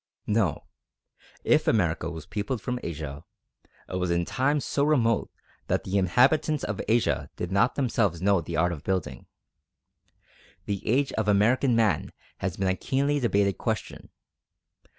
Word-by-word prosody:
No; 105 -8 0 0.8
if - - +3
America 85 -6 +1
was 80 -2 -8
peopled 105 +4 -3
from 125 +3 -3
Asia, 75 -3 -6 0.6
it 90 - -4
was 90 -1 -1
in 85 0 +1
times 140 - 0
so 140 - 0
remote 120 -7 +2 0.4
that - - 0
the 95 - -4
inhabitants 140 - +3
of 100 - -3
Asia 115 +2 +1
did 90 - -4
not 100 +6 +2
themselves 115 - 0
know 95 0 +2
the 85 0 -5
art 85 +3 +2
of 75 -4 -6
building. 95 -3 -3 1.4
The 100 -2 -4
age 135 +5 +1
of 110 - -1
American 115 +5 +3
Man 110 -8 +1 0.3
has 95 -2 -3
been 95 - 0
a 95 - +2
keenly 140 +7 0
debated 100 - +1
question. - - -4
100 Hz, 150 wpm, -26 LUFS, 90-125 Hz, 1.4 s, if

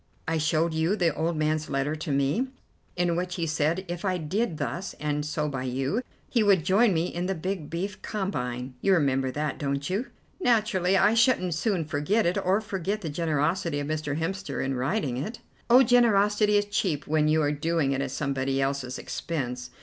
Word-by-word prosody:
I 160 0 0
showed 155 +2 +1
you 160 +5 +1
the 170 -6 +2
old 160 +2 -1
man's 155 0 0
letter 135 +2 0
to 155 -1 -4
me, 140 - +1 0.5
in 175 -1 +1
which 180 +1 -2
he 170 - -1
said 160 +4 0
if 175 0 -5
I 185 -2 +1
did 175 +2 -1
thus 180 +5 -4
and 150 0 -2
so 150 0 -2
by 130 -3 -3
you, 135 - -1 0.3
he 235 - +1
would 195 -6 +4
join 205 +4 +4
me 165 -1 +1
in 175 0 -3
the 190 - -1
big 180 -2 -4
beef 190 +4 -4
combine. 125 - -3
You 195 - +4
remember 135 -5 +2
that, 150 +1 -3
don't 140 0 -2
you?" 215 +8 -1 0.3
"Naturally, 210 - +2
I 205 +3 +4
shouldn't 230 -7 +3
soon 175 0 0
forget 150 +10 +1
it, 175 - +1
or 190 +4 +2
forget 205 0 -3
the 165 - -4
generosity 160 +1 0
of 145 - -3
Mr. 150 -1 -2
Hemster 190 -1 -3
in 135 - -1
writing 130 - -1
it." 215 - -4 0.3
"Oh, 250 +3 +8
generosity 210 -3 +4
is 205 - +2
cheap 185 -7 -1
when 155 0 +2
you 155 0 +3
are 145 - +2
doing 150 -1 0
it 135 0 0
at 140 - -2
somebody 135 -1 -1
else's 135 -2 -1
expense. 125 -6 -4
165 Hz, 195 wpm, -27 LUFS, 145-195 Hz, 0.5 s, Oh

